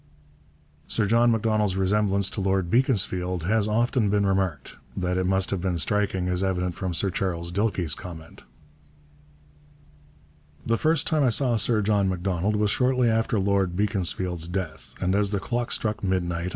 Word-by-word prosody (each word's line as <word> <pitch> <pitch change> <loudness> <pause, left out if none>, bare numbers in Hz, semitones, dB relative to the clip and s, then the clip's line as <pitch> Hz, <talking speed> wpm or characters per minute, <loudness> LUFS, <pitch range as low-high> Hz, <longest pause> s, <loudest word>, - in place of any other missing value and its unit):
Sir 110 - 0
John 115 +3 +3
Macdonald's 110 -3 +1
resemblance 100 0 +1
to 100 - -4
Lord 95 -2 0
Beaconsfield 95 -8 +1
has 105 +4 +1
often 115 0 +1
been 100 0 +2
remarked. 95 -5 -1 0.2
That 90 -1 -1
it 95 0 0
must 95 0 +1
have 95 -3 -2
been 90 -2 -1
striking 95 +1 0
is 90 +1 -1
evident 90 -2 -1
from 90 -1 -4
Sir 95 +3 0
Charles 85 -2 -2
Dilke's 95 -5 0
comment: 80 -2 -10 2.2
The 115 - +2
first 160 +4 +1
time 155 -3 +1
I 130 - +4
saw 120 +1 +1
Sir 110 0 +1
John 100 -2 +2
Macdonald 95 +2 -1
was 105 -1 +1
shortly 125 -1 +2
after 110 -1 0
Lord 95 -2 +1
Beaconsfield's 90 -4 -1
death 85 -5 -5
and 90 +1 0
as 100 0 +2
the 100 0 -1
clock 120 +4 -3
struck 110 0 -1
midnight. 90 -2 -1
95 Hz, 160 wpm, -25 LUFS, 90-110 Hz, 2.2 s, I